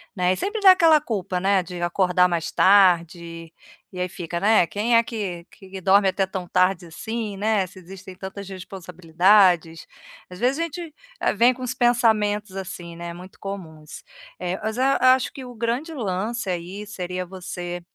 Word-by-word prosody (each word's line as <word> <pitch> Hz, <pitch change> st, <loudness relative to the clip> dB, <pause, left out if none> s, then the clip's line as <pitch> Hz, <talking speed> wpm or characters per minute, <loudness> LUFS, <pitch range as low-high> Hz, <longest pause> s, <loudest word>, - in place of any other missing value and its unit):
né, 180 Hz, 0 st, +2 dB
e -, -, -2 dB
sempre 415 Hz, -, -3 dB
dá 380 Hz, -1 st, +9 dB
aquela 330 Hz, -4 st, +5 dB
culpa, 195 Hz, -9 st, -3 dB
né, 195 Hz, 0 st, +2 dB
de 175 Hz, 0 st, -8 dB
acordar 180 Hz, +1 st, +2 dB
mais 170 Hz, -2 st, -2 dB
tarde, 170 Hz, -3 st, +2 dB, 0.4 s
e 180 Hz, -, -7 dB
aí 180 Hz, 0 st, -1 dB
fica, 170 Hz, -1 st, -5 dB
né, 210 Hz, -2 st, +4 dB
quem 230 Hz, +6 st, +1 dB
é 230 Hz, -, +4 dB
que 190 Hz, -7 st, -5 dB
que 190 Hz, -1 st, -11 dB
dorme 195 Hz, +1 st, +4 dB
até 195 Hz, 0 st, 0 dB
tão 185 Hz, -2 st, -6 dB
tarde 185 Hz, -1 st, +1 dB
assim, 220 Hz, +4 st, -5 dB
né, 210 Hz, -2 st, +1 dB
se 185 Hz, -, -17 dB
existem 185 Hz, +1 st, -11 dB
tantas 195 Hz, +1 st, -8 dB
responsabilidades. 180 Hz, -1 st, +1 dB, 0.4 s
Às 180 Hz, +1 st, -11 dB
vezes 255 Hz, +4 st, +1 dB
a -, -, +1 dB
gente 335 Hz, 0 st, -6 dB, 0.5 s
vem 245 Hz, +3 st, +5 dB
com 255 Hz, -, -13 dB
uns 250 Hz, 0 st, -2 dB
pensamentos, 215 Hz, -5 st, +1 dB
assim, 175 Hz, -3 st, -7 dB
né, 170 Hz, 0 st, -7 dB
muito 180 Hz, +2 st, -13 dB
comuns. 160 Hz, -6 st, -8 dB, 0.4 s
Eh, 180 Hz, +1 st, -3 dB
mas 220 Hz, +2 st, -3 dB
a 255 Hz, -1 st, +4 dB
acho 260 Hz, -, -1 dB
que 265 Hz, -2 st, -9 dB
o 245 Hz, -, -10 dB
grande 240 Hz, +8 st, -2 dB
lance 215 Hz, -1 st, -3 dB
aí 180 Hz, +4 st, -5 dB
seria 180 Hz, -3 st, -5 dB
você 175 Hz, -1 st, -6 dB
190 Hz, 175 wpm, -23 LUFS, 180-220 Hz, 0.5 s, dá